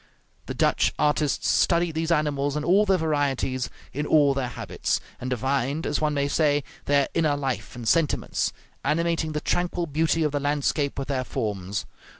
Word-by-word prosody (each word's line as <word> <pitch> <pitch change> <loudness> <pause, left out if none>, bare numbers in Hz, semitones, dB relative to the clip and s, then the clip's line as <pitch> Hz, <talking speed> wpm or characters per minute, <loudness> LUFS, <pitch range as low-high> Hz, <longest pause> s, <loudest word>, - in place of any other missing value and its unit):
The - - -4
Dutch - - +2
artists 150 -1 +1
studied 170 -2 +3
these 160 +1 -1
animals 145 -2 +1
in 150 - -2
all 195 +6 +4
their 190 -1 +4
varieties, 140 -5 0 0.2
in 150 +2 -2
all 145 -3 +5
their 135 -2 -1
habits, 110 -7 -2 0.2
and 125 - -4
divined, 135 +4 -1
as - - -1
one 150 -1 +1
may 140 0 +1
say, 145 -1 +2 0.2
their 140 -1 +3
inner 155 -3 +2
life 130 -6 -3
and 120 -2 -6
sentiments, 165 +3 +1 0.3
animating 165 0 0
the 150 - -2
tranquil 175 +1 0
beauty 160 +1 +1
of 150 - +1
the 145 - -1
landscape 145 0 0
with 135 - -3
their 130 -3 -1
forms. 100 -5 -3
145 Hz, 170 wpm, -25 LUFS, 135-160 Hz, 0.3 s, all